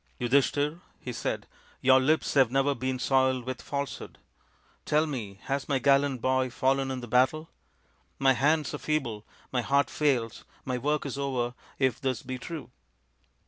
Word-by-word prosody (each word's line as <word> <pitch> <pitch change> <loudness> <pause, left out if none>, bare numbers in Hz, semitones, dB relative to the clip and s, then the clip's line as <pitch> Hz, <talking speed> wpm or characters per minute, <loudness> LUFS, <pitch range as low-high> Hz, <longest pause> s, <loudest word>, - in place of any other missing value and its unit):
" - - -37
Yudhishthir," 145 +5 +1 0.2
he 125 - -6
said, 115 - -3 0.2
" - - -30
your 130 0 +6
lips 150 +5 +1
have 135 -4 +5
never 135 +2 +2
been 130 0 -2
soiled 130 -1 +2
with 130 -1 -5
falsehood. 140 -1 -5 0.7
Tell 150 +1 +2
me, 110 -10 -5
has 135 +1 -3
my 140 - +2
gallant 140 -1 +3
boy 130 0 +2
fallen 135 +2 +1
in 130 -1 -3
the 120 - -7
battle? 130 +7 +2 0.7
My 135 -1 +4
hands 150 +4 +1
are - - -4
feeble, 120 -9 -2 0.2
my 125 - +1
heart 140 +3 +2
fails, 125 -7 0 0.2
my 125 -1 -2
work 150 +4 0
is 140 0 -4
over 125 -3 -1 0.2
if 130 -1 +1
this 130 -3 -1
be 130 -1 -5
true." 155 -5 -7
135 Hz, 170 wpm, -28 LUFS, 125-140 Hz, 0.7 s, your